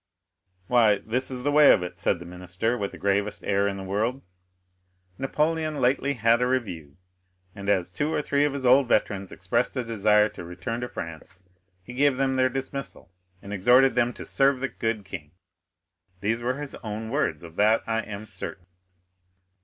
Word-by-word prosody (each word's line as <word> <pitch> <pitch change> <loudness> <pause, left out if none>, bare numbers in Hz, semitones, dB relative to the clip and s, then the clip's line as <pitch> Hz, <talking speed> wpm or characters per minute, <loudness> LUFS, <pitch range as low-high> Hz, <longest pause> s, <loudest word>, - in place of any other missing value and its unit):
"Why, 110 -3 +4
this 125 +6 -2
is 125 -2 -5
the 145 - +1
way 150 0 +7
of 90 - +3
it," 90 -1 -7
said - - +1
the 85 - -10
minister, 90 +6 -2
with 100 -5 -3
the - - -10
gravest 100 +1 -1
air 100 0 +1
in 100 -1 -3
the 95 - -6
world: 110 +8 -1 1.0
"Napoleon 155 +2 0
lately 135 +2 +2
had 115 0 +3
a 125 - +2
review, 90 - -3 0.6
and 100 0 -5
as 90 -3 +1
two 150 - -1
or - - 0
three 145 -1 +1
of 145 -1 +1
his 140 -2 -4
old 130 +1 +6
veterans 100 -4 0
expressed - - -1
a 125 - 0
desire 105 -2 +3
to - - -10
return 90 +7 -5
to 125 - -3
France, 85 -1 -8 0.4
he 125 - -10
gave 140 0 +2
them 135 0 +1
their 130 0 +3
dismissal, 135 -4 -5 0.3
and 100 - -7
exhorted 125 +7 +5
them 120 0 +2
to - - -9
'serve 135 -1 +2
the 135 +1 -2
good 115 -3 -3
king.' 85 -6 -8 0.9
These 110 +5 -1
were 125 +2 -1
his 145 -1 -6
own 110 0 -5
words, 90 - -1
of 85 -1 -11
that 110 +2 +4
I 115 0 0
am 105 -1 -7
certain." 95 -2 -7
115 Hz, 185 wpm, -26 LUFS, 100-130 Hz, 1.0 s, way